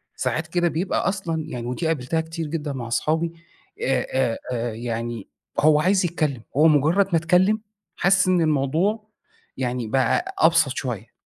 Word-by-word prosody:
ساعات 160 +1 -2
كده 175 +1 +1
بيبقى 170 +5 0
أصلًا، 165 -5 -3
يعني 120 -6 -5
ودي 160 +7 -2
قابلتها 160 +1 0
كتير 160 0 -5
جدًا 150 -2 -3
مع 125 -3 -5
أصحابي. 160 +7 0 0.5
آآ، 130 -2 0 0.2
آآ، 115 -1 -2
يعني 115 -1 -4 0.3
هو 150 0 +5
عايز 185 +3 +2
يتكلَّم، 155 -7 -1 0.2
هو 155 +2 +6
مجرَّد 160 +6 +3
ما 165 - +5
تكلَّم، 185 +6 +3 0.3
حاسِس 190 0 +3
إن 180 -2 +3
الموضوع، 160 +9 0 0.5
يعني، 125 -3 -2
بقى 350 - 0
أبسط 165 - +4
شوية. 120 -6 -5
155 Hz, 150 wpm, -23 LUFS, 130-175 Hz, 0.5 s, هو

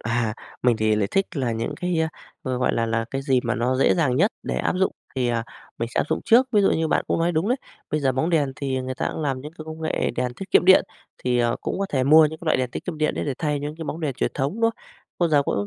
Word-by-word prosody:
À, 115 -1 0 0.3
mình 125 -2 +3
thì 110 0 +2
lại 100 -2 0
thích 195 0 +2
là 125 -4 0
những 115 +6 -3
cái, 180 -2 0
a, 160 - +1 0.4
g - - -4
gọi 125 - +2
là 115 - +1
là, 115 0 0
cái 135 0 -3
gì 130 -2 +2
mà 120 0 -1
nó 125 +2 0
dễ 135 - +4
dàng 145 -8 +1
nhất 200 +9 +3
để - - -3
áp - - 0
dụng 190 - +2 0.2
thì, 125 -2 +1
à, 115 -1 0 0.3
mình 115 - -2
sẽ - - 0
áp - - 0
dụng 160 - 0
trước. 245 +3 +5
Ví 210 - +5
dụ - - +4
như 160 0 +1
bạn - - +1
cũng - - +1
nói 170 +1 +2
đúng 165 +5 0
đấy, 250 - +2 0.3
bây 150 - 0
giờ 135 -2 +2
bóng 155 +7 0
đèn 145 -5 +2
thì 135 -2 -2
người 130 0 -4
ta - - -2
cũng 160 - -4
làm 135 -3 -1
những 150 +3 -9
cái 160 -2 -10
công 160 0 -8
nghệ 160 - 0
đèn 125 0 -1
tiết 195 +9 -8
kiệm - - +5
điện, 190 +1 +7 0.4
thì, 125 -1 +2
ờ, 120 -1 +1
cũng - - -3
có 195 - 0
thể 130 -6 0
mua 155 +3 +7
những 160 +1 -7
cái 170 - -11
loại - - +3
đèn 125 -1 -1
tiết - - -6
kiệm 165 -4 -5
điện 155 0 +1
đấy - - -2
để 140 - -2
thay 150 -2 -1
những 150 +2 -5
cái 165 - -6
bóng 155 +2 -5
đèn 150 -5 -2
truyền - - -1
thống, 140 +2 -1
đúng 230 - -6
không? - - -22 0.4
Vô 175 - +2
giờ 145 -2 +4
cũng 100 -6 -1
145 Hz, 315 wpm, -23 LUFS, 125-160 Hz, 0.4 s, điện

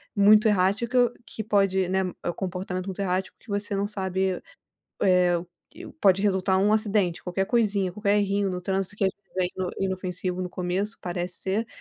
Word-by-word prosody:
muito 210 +2 +6
errática, 225 +5 +2
que 220 - -6
pode, 195 -3 +2
né 190 +1 +1 0.2
é - - -1
o 175 - -1
comportamento 185 0 -4
muito 190 0 -5
errático 190 0 -2
que - - -25
você 205 0 -2
não 200 +1 0
sabe, 190 -2 -1 0.6
eh, 180 -2 +4 0.3
que 340 +3 -11
o - - -11
pode 195 - +3
resultar 190 -2 +2
um 205 +2 +3
acidente, 205 -5 +1
qualquer 190 +2 -1
coisinha, 205 -5 +1
qualquer 205 +2 +1
errinho 200 -1 +1
no 180 -1 -3
trânsito 195 +1 -2
que 210 - -2
às 190 - +2
vezes, 205 - -47
é 185 - +3 0.2
ino 180 -1 -1
inofensivo 185 -1 -2
no 180 - -3
começo, 185 +5 -2
parece 175 0 -3
ser, 205 +5 -1
195 Hz, 190 wpm, -26 LUFS, 185-205 Hz, 0.6 s, muito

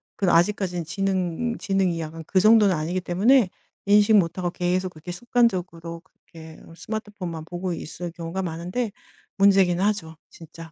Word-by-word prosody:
그래도 190 -3 +1
아직까지는 180 -1 +1
지능 195 +4 -2
지능이 195 -4 0
약간 160 0 -6
그 190 - +2
정도는 215 -2 +5
아니기 170 +4 -2
때문에 200 +5 +3 0.4
인식 205 +1 +5
못 175 -3 +2
하고 175 -1 -2
계속 180 +1 -1
그렇게 165 +1 -9
습관적으로 180 -6 -1
그렇게 160 -3 -15
어 165 - -14
스마트폰만 205 -8 -6
보고 175 +1 -4
있을 170 +2 -6
경우가 170 +2 -5
많은데 180 +7 -3 0.5
문제긴 190 -2 +4
하죠 195 -6 -1
진짜. 165 0 -12
180 Hz, 370 characters per minute, -24 LUFS, 165-200 Hz, 0.5 s, 정도는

